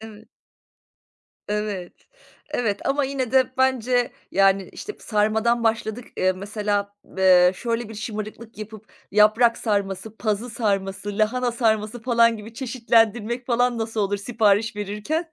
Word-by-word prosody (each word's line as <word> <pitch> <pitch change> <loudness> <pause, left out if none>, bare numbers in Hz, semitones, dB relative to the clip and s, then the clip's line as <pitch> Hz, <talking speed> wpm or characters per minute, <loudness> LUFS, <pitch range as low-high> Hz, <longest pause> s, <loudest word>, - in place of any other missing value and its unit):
Evet. 220 -1 -12 1.2
Evet. 210 -4 -3 0.6
Evet, 225 -8 -1
ama 280 +1 +1
yine 265 -3 -2
de, 260 -1 +3
bence, 250 -2 +2 0.2
yani, 195 -1 +3
işte, 420 - -7
sarmadan 220 +2 +1
başladık. 225 +1 -1
Iıı, 185 0 +2
mesela, 205 +1 -2
ııı, 185 -1 +4
şöyle 230 +1 -3
bir 225 - -9
şımarıklık 215 +1 -7
yapıp, 215 0 -10 0.2
yaprak 215 +3 +4
sarması, 200 -1 -2
pazı 220 +2 -2
sarması, 200 -2 -2
lahana 240 +3 +1
sarması 220 -1 0
falan 230 -1 +3
gibi 220 +2 -11
çeşitlendirmek 235 -1 +1
falan, 245 -1 +1
nasıl 225 -1 -2
olur 205 0 0
sipariş 215 0 +1
verirken? 210 - -3
220 Hz, 125 wpm, -23 LUFS, 205-240 Hz, 1.2 s, ııı